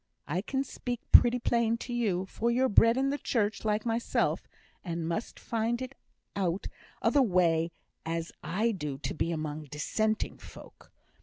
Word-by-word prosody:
I 175 +5 -1
can 265 +5 -1
speak 245 -3 -4
pretty 240 +1 +8
plain 235 -1 +1
to 245 +1 -6
you, 200 -6 0
for 230 +4 -1
you're 255 +2 +3
bred 230 +3 +5
in 270 +1 +2
the 285 - -2
Church 215 -3 0
like 215 0 0
mysel', 230 0 +1 0.4
and 170 -2 -3
must 170 +7 -3
find 230 +1 -1
it 260 0 -5 0.4
as 200 - -1
out 175 +3 -2 0.4
o' - - +4
the 285 - +5
way 170 -6 +3 0.3
as 165 0 -3
I 215 +7 +1
do 150 -9 -4
to 135 - -4
be 165 - -1
among 155 -1 -3
dissenting 215 +10 -1
folk. - - -14
215 Hz, 170 wpm, -30 LUFS, 170-235 Hz, 0.4 s, pretty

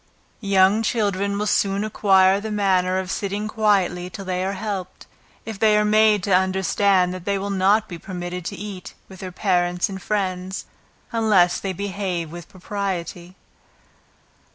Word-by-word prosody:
Young 195 0 +3
children 200 -3 0
will 210 - -1
soon 200 -1 +1
acquire 195 -2 +3
the 220 +2 -5
manner 185 -3 +1
of 185 -1 -3
sitting 200 +3 -3
quietly 195 -5 +1
till 195 +1 -8
they 185 0 -2
are 195 +1 -2
helped, 195 -2 -5 0.4
if 220 -3 -7
they 215 -1 +4
are 210 - +2
made 215 -1 +4
to 195 - 0
understand 190 0 +2
that 185 -1 -8
they 200 -1 0
will 200 +1 -3
not 200 +3 +2
be 170 -2 -8
permitted 180 0 -6
to - - -4
eat 200 -2 -8
with 190 -1 -13
their 185 -1 -6
parents 180 -2 0
and 190 -1 -7
friends, 190 -2 -3 0.5
unless 205 -6 +3
they 195 - -3
behave 185 -4 -3
with 175 0 -9
propriety. 185 -2 -5
195 Hz, 155 wpm, -22 LUFS, 185-205 Hz, 0.5 s, they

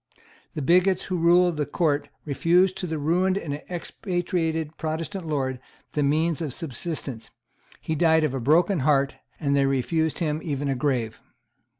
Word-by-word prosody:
The 150 - -3
bigots 180 +5 +3
who 185 - -2
ruled 175 0 +4
the 150 - 0
Court 145 -1 0 0.2
refused 175 +6 +3
to 180 - -3
the 160 -1 -2
ruined 180 +6 +1
and 145 -5 -4
expatriated 170 -3 -2
Protestant 165 +3 -4
Lord 130 -4 -1 0.3
the 150 - 0
means 155 +3 +1
of 150 -6 -3
subsistence; 135 -5 -5 0.5
he 160 - -2
died 160 0 +3
of 150 -4 0
a 135 - -2
broken 165 - +3
heart; 140 0 +2 0.2
and 140 -3 +1
they 140 -1 +3
refused 160 +4 0
him 155 -2 -1
even 145 -2 -2
a 135 - +1
grave. 125 -4 -1
155 Hz, 160 wpm, -25 LUFS, 140-175 Hz, 0.5 s, ruled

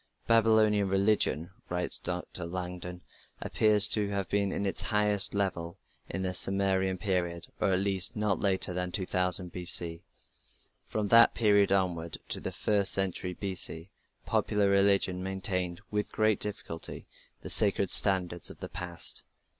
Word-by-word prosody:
"Babylonian 110 -3 +2
religion", 95 -4 0 0.2
writes 90 0 -1
Dr. 90 -1 -5
Langdon, 90 0 -7 0.4
"appears 105 -1 +3
to 105 -2 0
have 100 -2 -4
reached 100 -1 0
its 100 0 -2
highest 105 -2 +2
level 85 -4 -3 0.3
in 95 - -4
the 90 -1 -2
Sumerian 95 0 +1
period, 90 -4 -3
or 95 -2 0
at 90 - +1
least 95 -2 +2
not 105 -2 -1
later 95 -2 0
than 90 0 -3
2000 90 -1 -1
B.C. 85 -2 -1 0.8
From 105 -2 -4
that 115 0 +6
period 100 -3 +2
onward 85 -4 -1
to - - -4
the - - -4
first 100 +1 +1
century 95 -2 0
B.C. 95 -2 -2 0.3
popular 105 -1 0
religion 100 -2 +2
maintained 95 -2 -2
with 105 0 -3
great 110 -2 +1
difficulty 90 -5 -7 0.3
the - - -2
sacred 100 -2 +6
standards 90 -3 +2
of - - -13
the - - -8
past." 85 -2 0
95 Hz, 140 wpm, -28 LUFS, 90-100 Hz, 0.8 s, that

